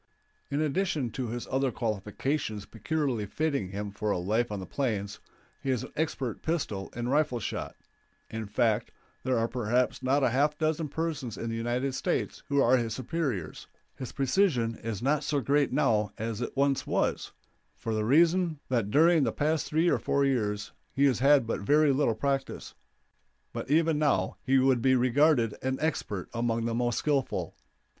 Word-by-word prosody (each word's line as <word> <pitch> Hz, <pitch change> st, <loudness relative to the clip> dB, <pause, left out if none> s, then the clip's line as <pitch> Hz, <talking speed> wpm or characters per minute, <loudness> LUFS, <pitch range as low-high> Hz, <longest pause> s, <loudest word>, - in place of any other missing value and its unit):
In 140 Hz, -, -1 dB
addition 155 Hz, -5 st, 0 dB
to 125 Hz, +2 st, -3 dB
his 120 Hz, +1 st, -4 dB
other 135 Hz, 0 st, +1 dB
qualifications 110 Hz, +1 st, -2 dB
peculiarly 125 Hz, -2 st, -2 dB
fitting 140 Hz, -7 st, -1 dB
him 100 Hz, +1 st, -5 dB
for 105 Hz, +1 st, -3 dB
a 100 Hz, -, +1 dB
life 110 Hz, +6 st, 0 dB
on 105 Hz, -, -3 dB
the 95 Hz, -, -6 dB
plains, 105 Hz, -5 st, -2 dB, 0.4 s
he 135 Hz, -, -3 dB
is 125 Hz, -3 st, 0 dB
an -, -, -9 dB
expert 135 Hz, -7 st, -2 dB
pistol 140 Hz, -, -2 dB
and 120 Hz, +1 st, -2 dB
rifle 145 Hz, -4 st, +2 dB
shot; 105 Hz, -, -4 dB, 0.5 s
in 110 Hz, -1 st, -5 dB
fact, 110 Hz, +1 st, +1 dB, 0.3 s
there 130 Hz, -1 st, 0 dB
are 115 Hz, 0 st, +1 dB
perhaps 125 Hz, +2 st, 0 dB
not 135 Hz, +2 st, +2 dB
a 125 Hz, -, +3 dB
half 145 Hz, +4 st, +2 dB
dozen 155 Hz, -1 st, 0 dB
persons 145 Hz, -9 st, -3 dB
in 115 Hz, -, -4 dB
the -, -, -3 dB
United 120 Hz, +4 st, -1 dB
States -, -, -2 dB
who 140 Hz, 0 st, +2 dB
are 130 Hz, -1 st, +5 dB
his 115 Hz, -2 st, -2 dB
superiors; 130 Hz, -, -3 dB, 0.3 s
his 130 Hz, -, -7 dB
precision 135 Hz, -, +1 dB
is 115 Hz, -1 st, -4 dB
not 145 Hz, +2 st, +2 dB
so 145 Hz, -, 0 dB
great 140 Hz, +2 st, +2 dB
now 105 Hz, -5 st, +2 dB
as 115 Hz, 0 st, -3 dB
it 120 Hz, -, -4 dB
once 140 Hz, -1 st, +1 dB
was, -, -, 0 dB, 0.4 s
for 115 Hz, -, -4 dB
the 110 Hz, 0 st, 0 dB
reason 165 Hz, +5 st, +3 dB
that 115 Hz, -5 st, 0 dB
during 160 Hz, +5 st, +5 dB
the -, -, +1 dB
past 155 Hz, +1 st, 0 dB
three 160 Hz, +3 st, +2 dB
or -, -, +3 dB
four 140 Hz, 0 st, +1 dB
years 105 Hz, -6 st, -1 dB, 0.2 s
he 140 Hz, -, +4 dB
has 130 Hz, -5 st, +3 dB
had 140 Hz, -1 st, +5 dB
but 115 Hz, -, -2 dB
very 150 Hz, +7 st, +4 dB
little 135 Hz, -5 st, +2 dB
practice; 135 Hz, +3 st, -2 dB, 0.8 s
but -, -, -5 dB
even 160 Hz, 0 st, +3 dB
now 150 Hz, -2 st, +1 dB
he 135 Hz, 0 st, +2 dB
would 130 Hz, -2 st, +3 dB
be 130 Hz, +1 st, +4 dB
regarded 125 Hz, -2 st, +3 dB
an 130 Hz, 0 st, -1 dB
expert 105 Hz, -, -2 dB
among 115 Hz, -1 st, 0 dB
the 115 Hz, -, -1 dB
most 120 Hz, 0 st, 0 dB
skillful. 140 Hz, -3 st, -1 dB
130 Hz, 180 wpm, -29 LUFS, 115-145 Hz, 0.8 s, are